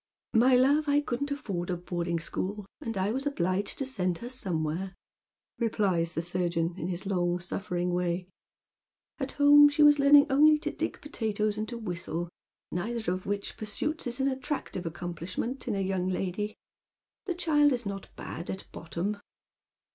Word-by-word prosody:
" - - -56
My 250 +3 +6
love, 285 +4 +4
I 285 0 +5
couldn't 285 0 -2
afford 195 -12 -3
a 180 - 0
boarding 170 -1 -2
school, 195 +5 -4
and 225 -3 -4
I 190 +2 +1
was 270 +4 -1
obliged 185 -6 0
to 270 - -2
send 185 -9 -1
her 240 +6 -7
somewhere," 185 -5 -2 0.6
replies 190 -7 +1
the 165 - 0
surgeon, 175 -1 0
in 175 -2 -4
his 180 +2 -3
long 175 -2 +1
Bull'ering 180 0 -2
way. 180 0 -1 0.5
" - - -47
At 270 -1 -3
home 290 0 +8
she 290 +1 +3
was 295 0 +7
learning 285 +1 +8
only 300 +3 +6
to 300 0 -3
dig 325 - -3
potatoes 215 -7 -1
and 215 0 -3
to 240 - -5
whistle, 175 -5 -4 0.4
neither 220 +1 -1
of 185 0 -6
which 200 0 -3
pursuits 270 +8 -3
is 245 +2 -3
an 270 - +2
attractive 265 - -3
accom 175 +2 -4
pUshment 205 +11 -4
in 225 - 0
a 195 - 0
young 190 -1 0
lady. 195 +3 -2 0.7
The 360 - -1
child 300 -4 +4
is 245 -3 -1
not 195 -1 -5
bad 170 - -7
at 190 - -4
bottom." 170 +5 -3
205 Hz, 175 wpm, -29 LUFS, 180-265 Hz, 0.7 s, home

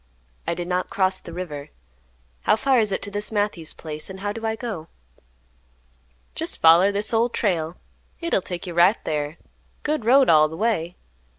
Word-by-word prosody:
"I 170 - 0
did 175 0 -4
not 180 0 -1
cross 190 -1 +1
the - - -11
river. 155 -5 -6 0.7
How - - +3
far 260 +2 +3
is 215 -2 +1
it 190 - -2
to 205 - -5
this 205 +2 -3
Matthews 205 -7 -1
place, 155 +1 -6
and 190 0 -8
how 205 0 -1
do 225 +1 -4
I 220 - -1
go?" 215 -10 -5 1.5
"Jest - - -4
foller 170 +5 +6
this 205 +3 0
Old 230 +2 +2
Trail. 170 -5 0 0.4
Hit'll 335 - 0
take 180 -1 -6
you 175 - -5
right 175 +6 +5
thar. 150 0 -2 0.5
Good 300 -4 -1
road 260 +4 +5
all 155 -1 +6
th' 160 - -8
way. 185 -6 0
190 Hz, 180 wpm, -23 LUFS, 165-220 Hz, 1.5 s, foller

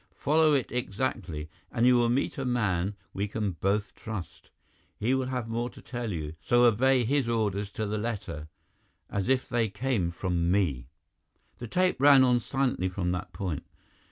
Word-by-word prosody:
"Follow 155 +1 +3
it 135 - -1
exactly, 100 -9 -3 0.2
and 115 - +2
you 125 0 +6
will 120 -1 +3
meet 130 +3 0
a - - -1
man 105 -6 0 0.2
we 100 +2 -1
both 100 0 -1
can - - -24
trust. 105 -6 -7 0.5
He 120 +5 +1
will 130 -1 0
have 125 -3 -3
more 120 +2 -2
to - - -14
tell 120 -2 -5
you, 80 -4 -4
so 120 +9 +3
obey 125 +2 +4
his 135 0 +1
orders 105 -3 0
to 110 - -2
the 105 +1 -2
letter, 95 -9 -4 0.6
as 100 +3 -1
if 130 -1 +2
they 120 -3 +1
came 115 -5 -1
from 85 -1 -1
me." 80 -11 +1 0.7
The 120 - -6
tape 180 +1 +1
ran 140 -2 +8
on 125 -1 +4
silently 125 -6 0
from 90 -1 -2
that 90 +1 -4
point. 85 -3 -4
110 Hz, 175 wpm, -28 LUFS, 95-125 Hz, 0.7 s, ran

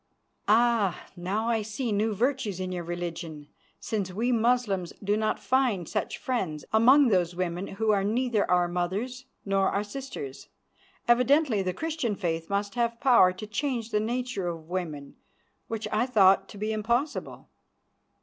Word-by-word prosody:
"Ah! 220 -4 +3
Now 195 +5 -2
I 225 -2 +1
see 220 +3 -3
new 210 +1 +1
virtues 245 -4 0
in 185 0 -3
your 175 -1 -3
religion, 170 -3 -5 0.3
since 200 -4 -3
we 230 +7 0
Moslems 230 -6 +1
do 205 +1 +2
not 215 0 0
find 245 - +1
such - - -2
friends 185 - -3
among 255 +5 +6
those 180 -4 +1
women 180 +1 -2
who 215 +2 0
are 200 -2 +2
neither 230 +1 +1
our 180 -1 +3
mothers 200 +9 -3 0.2
nor 195 -1 +2
our 200 - -1
sisters. 210 - -7 0.6
Evidently 250 -1 +4
the 185 -1 -1
Christian 305 - -2
faith 165 -4 -3
must 200 0 -1
have 235 -1 -1
power 240 -9 +6
to 185 +3 -8
change 235 +1 -2
the 210 - +2
nature 235 -3 -2
of 165 -2 -6
women, 155 -6 -4 0.5
which 225 -1 -4
I 220 +4 +1
thought 195 -5 +4
to - - -11
be 215 +2 -2
impossible. 235 +7 -2
210 Hz, 155 wpm, -27 LUFS, 185-240 Hz, 0.6 s, among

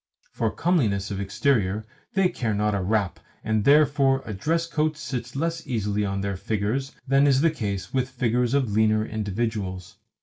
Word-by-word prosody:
For 115 - 0
comeliness 110 - 0
of 100 0 -3
exterior 105 0 0 0.3
they 195 -2 +4
care 120 -11 -2
not 105 +1 +1
a 100 - 0
rap, 100 0 0 0.2
and 110 -1 0
therefore 140 -2 +4
a 110 - -5
dress 165 - 0
coat 155 -2 -1
sits 125 -4 -5
less 165 +3 -2
easily 105 -4 -1
on 100 -1 -2
their 100 -1 -2
figures 110 +8 -2
than 135 +2 +4
is 135 -1 +4
the 165 0 +4
case 100 -10 -4
with 130 -1 0
figures 125 0 0
of 130 -6 +1
leaner 110 0 +3
individuals. 105 -4 -3
110 Hz, 170 wpm, -25 LUFS, 100-140 Hz, 0.3 s, they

